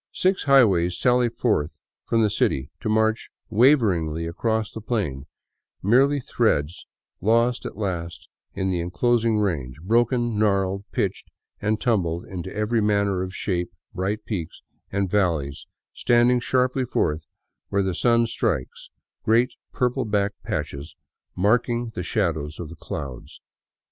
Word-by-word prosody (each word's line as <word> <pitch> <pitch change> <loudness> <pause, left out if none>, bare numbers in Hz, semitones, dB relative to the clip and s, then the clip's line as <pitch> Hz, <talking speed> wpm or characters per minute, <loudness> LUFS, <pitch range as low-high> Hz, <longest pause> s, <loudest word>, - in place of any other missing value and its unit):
Six 185 -2 +1
highways 100 -11 +4
sally 125 -1 +3
forth 75 -8 -1 0.3
from 115 -1 +2
the 105 - +2
city, 70 -9 0
to - - -3
march 110 +1 +1 0.2
waveringly 100 - +3
across 110 +6 -1
the 110 - -6
plain, 80 - -2 0.6
mere 135 +8 +4
threads 90 - 0 0.3
lost 115 +4 +2
at - - -10
last 85 -5 -4 0.3
in 95 -1 -1
the 90 - 0
enclosing 115 +5 +1
range, 75 -11 -2
broken, 120 +1 +1
gnarled, 100 -2 +1
pitched 100 -1 -2 0.3
and 105 +1 0
tumbled 90 -9 0
into 95 0 -6
every 105 +2 0
manner 100 -2 +1
of 95 +1 -5
shape, 90 -3 -2 0.2
bright 100 +4 -2
peaks 85 -7 -5 0.3
and 100 0 0
valleys 85 -8 0 0.3
standing 120 +1 +3
sharply 130 +1 +1
forth 80 -9 -1 0.4
where 100 0 +1
the 95 -1 -1
sun 115 +3 +3
strikes, 65 - -2 0.3
great 120 +3 +3 0.2
purple 125 +1 0
black 100 -1 +1
patches 70 +3 -4 0.4
marking 120 +4 +1
the 90 - -4
shadows 80 -6 -1
of 85 -3 -6
the 85 - -10
clouds. 70 -5 -7
105 Hz, 135 wpm, -24 LUFS, 85-115 Hz, 0.6 s, highways